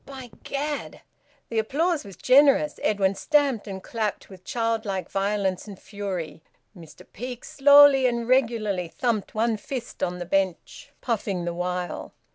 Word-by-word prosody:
By 265 -3 -10
Gad!" 290 +1 -4 0.5
The 230 - 0
applause 305 +8 0
was 200 -3 -11
generous. 280 - +4
Edwin 195 -2 +1
stamped 275 -1 +1
and 190 -1 -7
clapped 215 -3 -4
with 185 -1 -13
childlike 220 -5 -2
violence 195 -1 -1
and 200 -3 -10
fury. 190 -6 -6 0.3
Mr 165 -4 -14
Peake 245 +2 -7
slowly 285 -1 +6
and 235 -1 -2
regularly 225 -8 +1
thumped 220 +4 -2
one 225 0 +1
fist 245 +2 -7
on 180 0 -1
the 175 - -5
bench, 190 -1 -2
puffing 200 -7 -2
the 175 - -2
while. 180 0 -4
215 Hz, 140 wpm, -25 LUFS, 190-255 Hz, 0.5 s, slowly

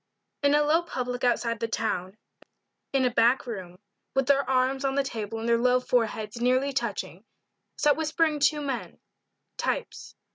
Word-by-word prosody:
IN 285 0 +4
a 295 - +4
low 310 +3 +3
public 250 -7 -4
outside 235 -2 +1
the 230 - -1
town 190 -4 -2 0.7
in 270 -2 +2
a 250 - +2
back 235 +4 +3
room 185 -7 -7 0.4
with 270 0 +2
their 275 -1 +2
arms 265 +1 +1
on 270 0 0
the 280 - +2
table 225 -4 -5
and 225 +1 -4
their 235 0 +3
low 250 +1 +3
foreheads 230 -2 -1
nearly 255 +3 +2
touching, 205 - -3 0.5
sat 295 -1 +3
whispering 315 -1 0
two 295 +1 +2
men 275 -4 -4 0.6
types. - - -3
250 Hz, 160 wpm, -27 LUFS, 230-280 Hz, 0.7 s, IN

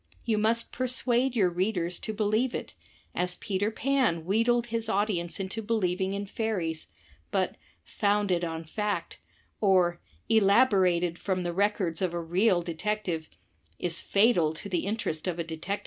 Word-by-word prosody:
You 220 -2 +1
must 230 +2 +1
persuade 255 0 0
your 190 -6 +3
readers 180 -1 -1
to 220 - -4
believe 215 +4 +1
it, - - -5 0.4
as 180 0 0
Peter 205 +1 -1
Pan 225 -9 +1
wheedled 230 +5 +2
his 230 -1 -2
audience 195 -5 0
into 195 +3 -3
believing 190 -3 0
in 200 0 -3
fairies; 190 -7 -2 0.4
but - - 0 0.3
"Founded 200 -4 +1
on 165 -1 -3
Fact" 205 +6 -3 0.4
or 180 -4 +3 0.3
"Elaborated 195 -6 +4
from 185 -2 -1
the 175 0 -2
Records 195 -3 0
of 180 -2 0
a - - -1
Real 175 +2 +2
Detect 210 +6 -2
ive," 160 -2 -3 0.5
is 175 -1 0
fatal 195 -7 +3
to 180 - -7
the 180 0 -1
interest 200 -7 -2
of 175 -2 -1
a 170 - -1
Detective 160 -1 -8
Story. 200 +2 -1
195 Hz, 155 wpm, -28 LUFS, 175-220 Hz, 0.5 s, Elaborated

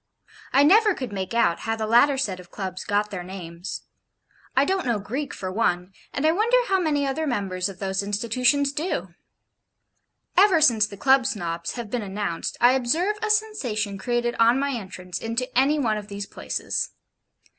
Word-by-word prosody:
I 275 - +5
never 415 +5 +5
could 255 -5 -5
make 190 +3 -4
out 170 -7 +2
how 225 0 -2
the 220 -1 -3
latter 240 +5 +4
set 200 -9 -2
of 180 -1 -13
Clubs 185 -2 -5
got 205 +1 0
their 185 -3 -4
names; 175 -1 -7 0.7
I 270 - +4
don't 380 -4 -1
know 235 -3 +2
Greek 255 +9 -4
for 185 -1 -5
one, 185 -3 0 0.2
and 280 - -2
I 315 - +5
wonder 440 +8 +3
how 385 -5 +2
many 295 -5 +1
other 295 +3 -1
members 195 -6 -1
of 195 - -10
those 190 0 -1
institutions 245 +7 +1
do? 315 +6 -3 1.2
Ever 380 -3 +6
since 230 -8 +4
the 200 - -10
Club 265 +2 +4
Snobs 170 -7 -3
have 235 -4 -6
been 245 - -1
announced, 195 -4 -3
I 245 - +6
observe 315 - +1
a 435 - -1
sensation 250 - 0
created 240 +2 0
on 230 +2 +5
my 280 +1 0
entrance 185 -6 -6
into 230 +3 -3
any 275 +4 +4
one 225 -7 +1
of 205 - -11
these 200 -1 -5
places. - - -3
235 Hz, 180 wpm, -24 LUFS, 195-280 Hz, 1.2 s, Ever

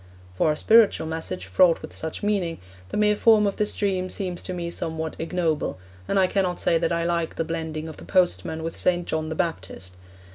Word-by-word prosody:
For 120 +11 +2
a - - -1
spiritual 220 -5 +5
message 160 - -4
fraught 165 - +3
with - - -8
such 160 +4 -5
meaning, 195 -5 0 0.3
the - - -3
mere 210 0 +3
form 215 0 +5
of 200 - -1
this 210 - +1
dream 185 -2 -1
seems 185 -3 -3
to - - -6
me 170 -1 -4
somewhat 160 -1 -4
ignoble, 165 - -1 0.3
and 200 - 0
I 190 - +5
cannot 185 -1 0
say 165 - +2
that 165 - 0
I 170 0 0
like 170 -1 -1
the 165 - -1
blending 160 -1 -4
of 160 - -9
the - - -11
postman 175 -3 +1
with 165 - -4
St. 175 -1 0
John 155 0 -2
the 160 - -3
Baptist. 95 - -4
170 Hz, 210 wpm, -24 LUFS, 160-185 Hz, 0.3 s, spiritual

